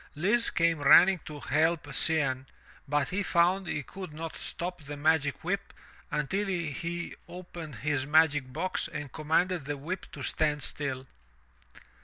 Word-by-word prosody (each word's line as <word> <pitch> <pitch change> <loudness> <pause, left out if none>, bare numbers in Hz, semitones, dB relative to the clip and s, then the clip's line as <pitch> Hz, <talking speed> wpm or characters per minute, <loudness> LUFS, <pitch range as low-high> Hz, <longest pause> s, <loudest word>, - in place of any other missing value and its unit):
Lise 210 +10 +2
came 165 -2 +2
running 180 +6 +7
to 150 -1 -7
help 155 +3 +1
Cianne, 135 -5 +1 0.4
but 145 +1 +1
he 190 +4 -1
found 180 +1 +2
he 145 - -2
could 185 +2 -8
not 160 +1 -6
stop 180 0 -4
the 145 +1 -7
magic 150 -1 +1
whip 200 +3 -2 0.4
until 190 +8 -1
he 170 -1 -3
opened 175 -5 -8
his 135 +3 -1
magic 150 -4 +3
box 180 +7 -1
and 145 -3 -6
com 155 +2 -8
manded 175 0 +2
the 145 0 -3
whip 175 +7 -5
to - - -8
stand 150 -2 0
still. 135 -3 -3
160 Hz, 150 wpm, -29 LUFS, 145-180 Hz, 0.4 s, running